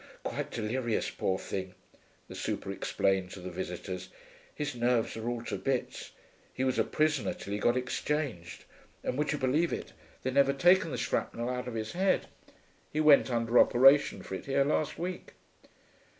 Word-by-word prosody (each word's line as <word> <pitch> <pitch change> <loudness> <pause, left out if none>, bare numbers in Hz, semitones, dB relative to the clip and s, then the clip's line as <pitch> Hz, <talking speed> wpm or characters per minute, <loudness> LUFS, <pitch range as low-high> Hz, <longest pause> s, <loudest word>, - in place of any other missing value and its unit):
'Quite - - -3
delirious, 115 +1 -1
poor 95 - -1
thing,' 95 -1 -5 0.5
the - - -9
super - - -3
explained 95 -2 0
to - - -8
the 90 0 -7
visitors. 90 +1 -5 0.5
'His 145 -1 -3
nerves 120 -1 +1
are 110 +1 -3
all 120 -1 -3
to 105 -4 -3
bits. 130 +3 -3 0.4
He 130 - -3
was 130 -1 +1
a - - +5
prisoner, 150 -9 0
till 100 - -7
he 105 - -1
got 120 +3 +2
exchanged. 125 - -3 0.4
And - - -2
would 150 +2 0
you 150 - -1
believe 145 +6 +1
it, - - -5 0.3
they'd 130 - -1
never 140 0 +4
taken 175 +4 +4
the - - -3
shrapnel 120 +1 -2
out 125 -1 -4
of 120 - -5
his 110 -1 -3
head; 190 +2 +1 0.7
he 155 - -2
went 150 -3 +6
under 115 0 +2
operation 135 -5 +5
for - - -8
it 95 - -6
here 140 0 +3
last 150 +1 0
week.' 180 +1 -5
125 Hz, 175 wpm, -30 LUFS, 110-145 Hz, 0.7 s, went